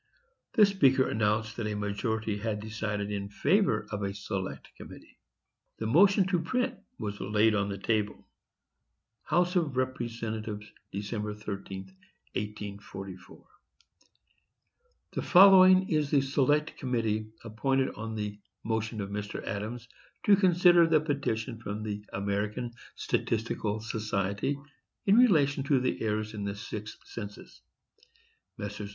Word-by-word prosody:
The 215 - +7
speaker 135 -10 +3
announced 110 +1 0
that 115 -3 -2
a 105 - -2
majority 105 +1 -2
had 105 -1 -2
decided 105 -1 -3
in 100 -1 -3
favor 190 - +2
of 105 -1 -3
a 100 0 -2
select 100 -2 -5
committee. - - -13 0.6
The 110 - -4
motion 190 - +5
to 180 -3 +2
print 250 +9 0 0.2
was 100 -1 -5
laid 105 +1 +3
on 100 -1 0
the 100 - -4
table. 105 0 -1 1.0
HOUSE 175 +4 +2
OF 150 -7 0
REPRESENTATIVES. 115 -4 -3 0.3
Dec. 105 +1 -4
13, 95 -2 -6 0.4
1844.—The 100 - -10
following 185 0 +7
is 155 -6 +1
the 140 -1 +4
Select 145 +3 +1
Committee 110 -4 -1 0.2
appointed, 130 +4 0
on 110 +1 -5
the 105 -1 -4 0.2
motion 110 -1 -2
of 100 0 -5
Mr. 105 0 -4
Adams, 110 +4 -4 0.4
to 205 - +7
consider 175 -3 +5
the 160 -1 +4
petition 130 -6 -2
from 105 -1 -5
the 105 -1 -4
American 105 +4 -2 0.2
Statistical 110 -1 -1
Society 105 +2 -1 0.5
in 200 - +5
relation 150 - +4
to 140 -2 +3
the 125 0 -1
errors 110 0 -1
in 105 -2 -5
the 100 0 -3
sixth 105 0 -7
census: 105 -3 -9 1.0
Messrs. 100 0 -5
110 Hz, 125 wpm, -29 LUFS, 105-140 Hz, 1.0 s, The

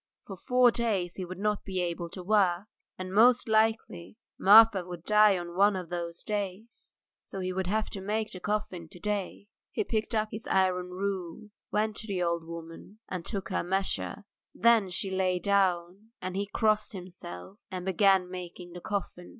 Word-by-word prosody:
For 195 - -7
four 250 +5 +4
days 205 -7 -1
he 185 - -4
would 185 +1 -8
not 210 +1 -1
be 190 -2 -3
able 170 -1 -2
to 185 +1 -8
work, 195 -2 +2 0.3
and 185 0 -6
most 240 +4 +5
likely 220 -4 0 0.2
Marfa 210 -1 +7
would 175 -2 -8
die 210 0 +5
on 175 -1 -7
one 200 +2 +4
of 180 -3 -5
those 170 -1 -5
days; 205 +1 -5 0.3
so 195 - -8
he 185 0 -2
would 190 -1 -2
have 215 +3 0
to 195 - -6
make 215 +2 -2
the 185 - -7
coffin 185 -4 -3
to 180 - -13
day. 200 0 -3 0.3
He - - -1
picked 225 - -2
up 215 0 +1
his 220 +1 -7
iron 185 -1 +2
rule, 195 +2 -4 0.2
went 215 0 0
up - - -5
to 220 - -11
the 190 -3 -1
old 170 -1 0
woman 165 +4 -10
and 185 -2 -4
took 195 -2 -4
her - - 0
measure. 195 +3 -2 0.3
Then 230 -4 +4
she 185 +2 -3
lay 185 -1 +1
down, 190 +1 0
and 185 0 -5
he 200 +1 -1
crossed 215 +1 +1
himself 180 - -9
and 185 -2 -5
began 190 -1 +3
making 180 -1 -8
the 175 - -8
coffin. 185 -3 -4
190 Hz, 185 wpm, -29 LUFS, 180-210 Hz, 0.3 s, Marfa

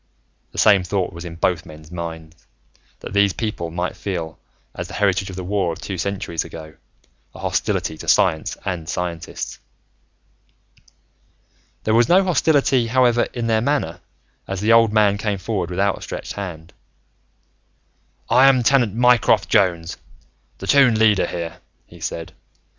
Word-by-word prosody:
The - - -13
same 100 -3 +5
thought 95 0 -2
was 85 +1 -8
in 85 -1 -7
both 85 0 0
men's 75 +1 -13
minds, 80 -1 -8 0.5
that - - -8
these 100 -1 +3
people 105 -7 -3
might 90 +2 -3
feel, 85 -5 -5 0.3
as - - -6
the - - -9
heritage 95 -1 +1
of 95 - -8
the 95 - -5
war 95 -2 0
of 80 - -7
two 95 -3 -5
centuries 90 -3 -2
ago, 80 -1 -10 0.6
a - - -10
hostility 80 - -1
to - - -9
science 80 - +2
and 85 -4 -4
scientists. 85 -2 -4 2.2
There 110 - +1
was 115 +1 +4
no 185 +2 +5
hostility, 140 -8 +2
however, 120 0 +3
in 120 -1 -4
their 110 -1 +2
manner 115 - -1 0.5
as 95 -1 -3
the 110 +3 +3
old 115 -1 +5
man 105 -2 +3
came 105 -2 -1
forward 95 -2 -3
with 90 - -4
outstretched 100 0 -2
hand. 90 -4 -7 1.5
"I 130 +2 +5
am 130 -2 +4
Tenant 120 -5 +3
Mycroft 120 -3 +3
Jones, 90 -6 +1 0.6
the - - -8
Toon 135 -6 +5
Leader 110 -3 +3
here," 85 -1 -5 0.3
he - - -16
said. 80 -1 -5
100 Hz, 150 wpm, -21 LUFS, 85-115 Hz, 2.2 s, same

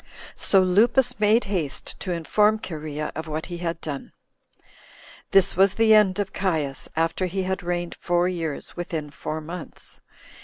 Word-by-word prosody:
So 195 - +4
Lupus 230 +7 +3
made 215 +3 +4
haste 175 -8 -3
to 185 - -4
inform 210 +6 +2
Cherea 155 -6 -5
of 160 +1 -6
what 155 +1 -3
he - - -4
had 170 -1 -3
done. 145 -3 -6 0.4
5. - - -38 0.7
This 195 -1 +4
was 190 +1 +4
the 225 -1 +5
end 205 -3 +5
of 200 -2 -2
Caius, 155 -8 -1
after 165 +3 0
he 190 +2 -2
had 190 +1 -2
reigned 175 -1 -2
four 175 0 +1
years, 165 -5 -3
within 160 -4 -4
four 155 +2 -5
months. 165 +1 -9
175 Hz, 160 wpm, -24 LUFS, 160-195 Hz, 0.7 s, the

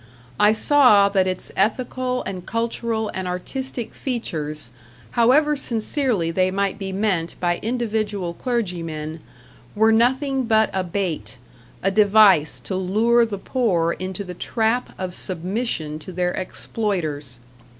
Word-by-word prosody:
I 210 0 +6
saw 220 -4 +5
that 190 -2 +2
its 185 -1 -3
ethical 250 +4 0
and 185 -2 -5
cultural 230 0 -2
and 190 -1 -3
artistic 240 +7 -5
features, 155 - -4 0.4
however 290 +6 +4
sincerely 230 - -1
they 185 +2 +2
might 200 +1 -1
be 195 -1 -4
meant 190 -4 -1
by 175 -1 0
individual 215 -6 -2
clergymen, 170 - -3 0.6
were 220 +1 +4
nothing 260 +3 +2
but 220 -1 +3
a 190 -1 0
bait, 170 - -3 0.5
a 195 - +3
device 200 -6 +5
to 190 - -4
lure 225 +6 +3
the 205 -2 -4
poor 190 -7 +1
into 185 +2 -4
the 180 -2 -7
trap 225 +6 0
of 185 -1 -4
submission 180 -4 -3
to 170 - -9
their 180 0 0
exploiters. 165 - -3
200 Hz, 130 wpm, -22 LUFS, 180-230 Hz, 0.6 s, I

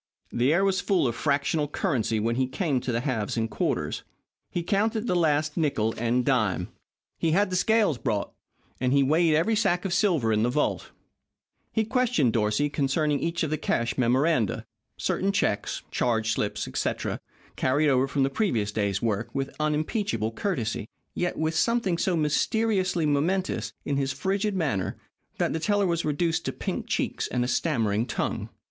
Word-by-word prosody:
The 125 +4 +2
air 185 +5 +3
was 195 0 +1
full 190 -9 +2
of 120 - -1
fractional 145 +3 +1
currency 125 - 0
when 115 +2 0
he 130 0 +1
came 140 -1 0
to 125 - -3
the 115 0 0
halves 120 -6 -2
and 115 0 +1
quarters. 105 - -2 0.5
He 175 - -2
counted 215 +4 0
the 180 - +1
last 155 -2 +1
nickle 115 -9 +1
and 120 +2 0
dime. 110 -9 +1 0.5
He 160 -1 +1
had 200 +1 +2
the - - 0
scales 205 - +2
brought, 100 - -1 0.5
and 125 +1 +1
he 140 0 +5
weighed 155 +3 +3
every 200 +8 +2
sack 180 -4 +1
of 185 - -1
silver 170 - +2
in 105 - +2
the 120 - +2
vault. 150 +4 -1 0.8
He 220 -1 +1
questioned 240 - +2
Dorsey 105 +5 +1
concerning 145 +1 0
each 170 0 -1
of 155 - -2
the 155 - -1
cash 120 -1 0
memoranda 125 - +1 0.3
certain 195 +1 0
checks, 195 - -1
charge 115 -2 +1
slips, 105 -1 -2
etc., - - -2 0.4
carried 145 +4 +2
over 130 0 +3
from 140 0 0
the 135 - +1
previous 120 - 0
day's 100 -2 -1
work 110 -1 -1
with 135 0 -3
unimpeachable 150 - 0
courtesy, 115 - -2 0.2
yet 175 0 -2
with 160 +1 0
something 205 -3 +1
so 180 -3 +1
mysteriously 185 +3 +1
momentous 165 +6 0
in 140 - 0
his 135 -1 0
frigid 195 +8 -1
manner, 110 - -1 0.4
that - - 0
the 160 - -1
teller 205 +3 +2
was 170 -2 0
reduced 160 +2 0
to - - -1
pink - - -4
cheeks - - -1
and 125 0 -1
a - - -2
stammering 115 -6 0
tongue. - - -2
150 Hz, 175 wpm, -26 LUFS, 120-180 Hz, 0.8 s, he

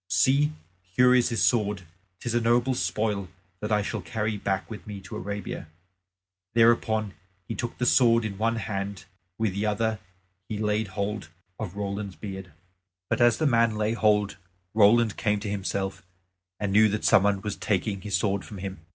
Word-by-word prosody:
See, 145 +6 +3 0.3
here 115 +8 +3
is 125 -1 +4
his 115 -3 0
sword; 105 -5 +2 0.4
'tis 120 - -3
a 120 - +2
noble 120 +3 +3
spoil 105 -5 -1 0.3
that 105 +1 -4
I 105 -1 +3
shall - - -3
carry 110 -2 -2
back 95 -1 -2
with 110 -2 -9
me 105 -2 -6
to 90 - -9
Arabia." 100 -4 -5 0.9
Thereupon 110 -3 +3 0.3
he - - -3
took 120 -1 -4
the 125 - 0
sword 115 -2 +4
in 100 -2 -5
one 115 +1 +1
hand, 100 -3 -4 0.3
with 110 -4 0
the 100 +3 -1
other 110 +1 0 0.5
he 110 - -3
laid 105 0 0
hold 100 0 -3 0.3
of 100 -4 -5
Roland's 100 -1 -4
beard. 95 -3 -7 0.6
But - - +1
as 120 -2 +5
the 155 - 0
man 115 -4 +3
laid 105 +2 0
hold, 105 -2 +2 0.4
Roland 110 +1 +4
came 105 -2 +1
to 105 -1 -3
himself, 95 -1 -3 0.6
and 100 -2 -1
knew 110 +1 +6
that 105 +1 -2
some - - +6
one 100 -1 +1
was 105 -2 -3
taking 100 0 -1
his 100 -1 0
sword 100 0 0
from 105 - -9
him. 95 -1 -6
105 Hz, 175 wpm, -26 LUFS, 100-115 Hz, 0.9 s, knew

